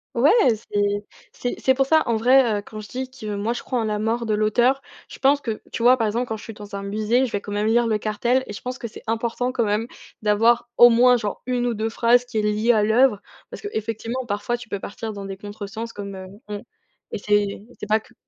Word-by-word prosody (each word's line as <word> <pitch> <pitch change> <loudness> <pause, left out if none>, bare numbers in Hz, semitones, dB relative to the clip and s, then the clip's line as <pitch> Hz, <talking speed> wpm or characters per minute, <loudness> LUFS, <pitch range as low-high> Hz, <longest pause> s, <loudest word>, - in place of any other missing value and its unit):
Ouais, 265 +6 +5 0.2
c'est 205 -2 -1 0.3
c'est 245 - -4
c'est 260 - +3
pour 270 0 +2
ça 315 +2 +4
en 230 - +2
vrai, 240 -1 +4
heu, - - -6
quand 215 - -9
je 210 - -9
dis 260 +1 -4
que 215 -5 -6
moi 215 +4 -1
je - - -5
crois 250 -2 -2
en - - 0
la 210 -1 -1
mort 230 +2 -1
de 215 - 0
l'auteur, 240 +6 +2 0.3
je - - -11
pense 280 +1 +3
que 220 -2 -4
tu 230 - -3
vois 255 +1 +6
par 225 -2 +1
exemple, 240 +4 -1
quand 220 - -3
je - - -12
suis 225 - -8
dans 205 -1 -9
un 200 - -4
musée, 215 +5 +1
je 235 - -6
vais 205 - -2
quand 205 - -8
même 205 +1 0
lire 235 +1 +3
le 215 -1 +1
cartel 240 +5 0
et 210 - -6
je - - -8
pense 250 +1 -5
que 235 - -4
c'est 215 - -12
important, 235 +2 -1
quand 235 -3 0
même, 210 +2 0 0.4
d'avoir 230 +3 +3
au 240 0 +9
moins 245 +1 +5
genre 210 -3 -4
1 245 -1 0
ou 235 - 0
2 220 +1 -1
phrases 240 +2 +3
qui 245 -3 -5
est - - +2
liée 210 +3 +2
à 215 -2 +3
l'œuvre, 220 -1 +3 0.3
parce - - -8
qu'effectivement, 230 - -4
parfois 205 +4 -2
tu 235 -2 -12
peux 200 - -3
partir 220 +2 -6
dans 200 -1 -7
des 195 0 -6
contre-sens 210 +2 -7
comme, 200 -1 -7
heu, 190 0 -8 0.2
hem, 205 -1 -6 0.5
et - - -3
c'est 205 0 0
c'est 210 - -6
pas 215 +1 +3
que 245 - -21
225 Hz, 260 wpm, -23 LUFS, 210-245 Hz, 0.5 s, au